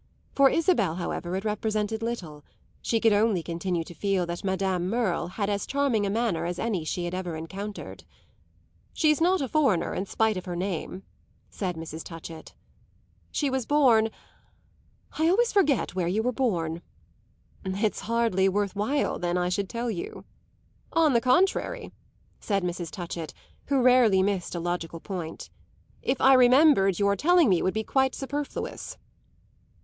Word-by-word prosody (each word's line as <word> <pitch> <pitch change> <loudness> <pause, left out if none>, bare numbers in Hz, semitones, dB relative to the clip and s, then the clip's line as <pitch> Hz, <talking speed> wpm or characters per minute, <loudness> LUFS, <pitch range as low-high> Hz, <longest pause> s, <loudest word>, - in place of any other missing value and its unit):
For 275 -1 +5
Isabel, 325 - +2
however, 175 0 -3
it 195 +3 -4
represented 215 +1 -1
little; 175 -11 -5 0.4
she 230 - 0
could 225 -1 +4
only 205 -4 +2
continue 170 0 -2
to 175 - -11
feel 190 +1 0
that 170 0 -5
Madame 190 -2 -1
Merle 205 -7 0
had 200 +3 -3
as 200 -1 -2
charming 265 -7 +1
a - - -1
manner 200 -6 0
as 175 0 -3
any 205 -7 -1
she 175 +3 -3
had 175 - -4
ever 180 -3 -3
encountered. 195 +6 -7 0.9
"She's 305 -1 +2
not 365 +2 +3
a 270 - -1
foreigner 255 - +1
in 195 - -3
spite 220 -1 +1
of 185 - -6
her 175 -2 -4
name," 185 +1 -4 0.5
said 185 -3 -3
Mrs. 160 0 -7
Touchett. 165 -1 -10 0.8
"She 285 -3 0
was 260 -3 -2
born 245 -7 +4 1.1
I 320 +1 +4
always 465 +6 +3
forget 305 - +2
where 180 -2 -1
you 205 +5 0
were 250 - +1
born." 170 -10 -1 0.8
"It's 200 +3 -1
hardly 225 -5 +1
worth 200 0 -1
while 240 +9 0
then 175 0 -1
I 180 0 0
should 195 +2 -2
tell 235 0 -2
you." 180 - -6 0.7
"On 320 -4 +4
the 235 - +3
contrary," 385 - +1 0.5
said 200 -3 -1
Mrs. 175 -1 -3
Touchett, 170 -4 -6 0.3
who 270 -2 +2
rarely 240 -7 +5
missed 190 -3 -1
a - - -2
logical 170 -1 -3
point; 175 -4 -6 0.5
"if 260 - -1
I 270 - +6
remembered 255 - +5
your 200 -1 +2
telling 340 - +4
me 180 -3 +3
would 185 - 0
be 220 - 0
quite 265 +2 +1
superfluous." 285 +2 -5
200 Hz, 160 wpm, -26 LUFS, 180-250 Hz, 1.1 s, I